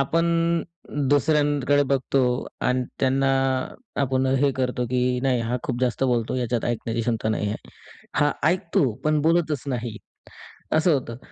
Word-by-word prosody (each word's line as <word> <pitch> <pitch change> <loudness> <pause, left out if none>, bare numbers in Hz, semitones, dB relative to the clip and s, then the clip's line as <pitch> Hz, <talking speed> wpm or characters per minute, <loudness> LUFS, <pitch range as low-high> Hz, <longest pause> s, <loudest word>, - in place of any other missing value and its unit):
आपण 165 +5 +1 0.8
दुसऱ्यांकडे 145 -1 +3
बघतो. 135 0 +1 0.4
आणि 125 0 +1 0.2
त्यांना 135 +1 +2 0.7
आपण 130 0 0 0.2
हे 140 - +4
करतो, 125 -1 -1
की 125 0 +1
नाही 130 -3 +2
हा 120 +2 -1
खूप 125 -2 -3
जास्त 125 +1 +1
बोलतो, 120 -2 0
याच्यात 120 -2 -1
ऐकण्याची 115 -1 -2
क्षमता 110 -2 -1
नाही 105 -1 0
आहे. 105 - -2 0.6
हा 145 0 +3 0.2
ऐकतो 175 - +1
पण 155 0 +2
बोलतच 160 -3 +1
नाही, 120 -3 -3 0.8
असं 160 +1 +4
होतं. 115 -4 -3
130 Hz, 140 wpm, -24 LUFS, 120-145 Hz, 0.8 s, हे